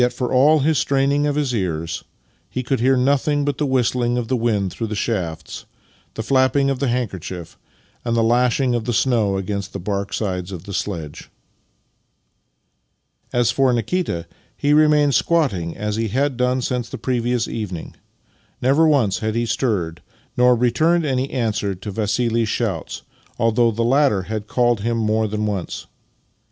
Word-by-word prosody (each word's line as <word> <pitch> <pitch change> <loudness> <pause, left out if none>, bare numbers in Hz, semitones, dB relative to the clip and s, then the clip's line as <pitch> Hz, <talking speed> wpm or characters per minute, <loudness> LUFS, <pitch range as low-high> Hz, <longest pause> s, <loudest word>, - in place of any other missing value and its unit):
for 125 0 -3
all 145 +4 +5
his 155 +1 +2
straining 140 +1 +1
of 145 - 0
his 145 -4 0
ears, 85 -6 -2 0.5
he 130 - -3
could 130 +2 -1
hear 130 +2 +3
nothing 140 +2 +2
but 145 -1 -2
the 150 - +1
whistling 125 -1 +1
of 120 -2 -3
the 130 - +2
wind 110 -5 0
through 115 - -3
the 105 - -4
shafts, 85 -8 -3 0.5
the 110 - -3
flapping 135 +2 +2
of 135 - -3
the 140 - 0
handkerchief, 95 -8 -4 0.5
and 115 -1 -1
the 115 - +3
lashing 125 +2 +2
of 120 -2 -1
the 120 - -1
snow 110 -7 +2
against 100 0 -4
the 100 - -4
bark 100 +1 -3
sides 95 -3 -3
of 90 -3 -7
the 100 - -8
sledge. 80 -7 -4 2.0
As 120 -2 +2
for 135 -2 +2
Nikita, 120 - -1 0.3
he 145 +1 +2
remained 150 -2 +4
squatting 115 - +1
as 105 0 -2
he 115 0 0
had 135 +5 0
done 125 +1 0
since 125 -2 -2
the - - -6
previous 120 -1 -1
evening. 100 -7 -5 0.7
Never 140 +6 +4
once 125 -11 +2
had 110 -1 -2
he 120 0 +1
stirred, 100 -10 -1 0.3
nor 125 0 +5
returned 155 +8 +2
any 135 -1 0
answer 105 -5 -1
to 100 +3 -7
Vassili's 115 +2 0
shouts, 100 -10 -3 0.3
although 115 +1 +3
the 115 +1 -1
latter 130 -5 +3
had 105 +2 -5
called 120 -2 +2
to - - -7
him 115 0 0
more 110 0 +1
than 105 +1 -2
once. 100 -4 -4
120 Hz, 165 wpm, -21 LUFS, 105-130 Hz, 2.0 s, all